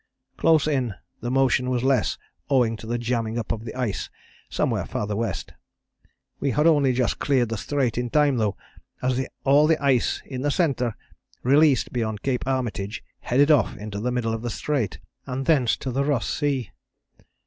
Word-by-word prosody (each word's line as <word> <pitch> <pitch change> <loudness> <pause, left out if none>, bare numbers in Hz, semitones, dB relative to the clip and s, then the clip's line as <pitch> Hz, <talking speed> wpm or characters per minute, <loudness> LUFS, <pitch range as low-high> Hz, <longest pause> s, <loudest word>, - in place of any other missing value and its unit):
Close 160 -2 +3
in, 130 -8 0 0.2
the 120 - -4
motion 130 -1 +2
was 125 -1 0
less 130 -7 +2 0.3
owing 125 -5 +3
to 110 - -10
the 120 +1 -1
jambing 115 -1 -1
up 115 - -2
of 115 0 -4
the 110 - -7
ice 125 -6 -2 0.4
somewhere - - 0
farther 105 0 -3
west. 110 -2 -3 0.9
We 140 - 0
had 150 +3 +1
only 145 -5 +4
just 125 -3 0
cleared 130 -5 +2
the 115 - -2
Strait 125 0 -1
in 120 0 -2
time 145 -1 +3
though, 105 -4 0 0.5
as 130 +1 +1 0.2
all 145 +2 +5
the 160 -1 +3
ice 135 -4 +1
in 130 -2 -5
the 145 - +1
centre, 135 - 0 0.5
released 135 -5 +4
beyond 110 -4 -2
Cape 130 -1 -1
Armitage, 120 -6 -2 0.2
headed 145 +5 +3
off 115 -11 +3
into 105 -1 -6
the 125 +4 -1
middle 120 -2 -1
of 115 - -3
the 120 - -3
Strait, 130 -3 -2 0.3
and 130 +1 -3
thence 135 -7 +3
to 130 - -4
the 135 +3 0
Ross 140 -4 0
Sea. 140 -8 -1
125 Hz, 180 wpm, -24 LUFS, 115-140 Hz, 0.9 s, all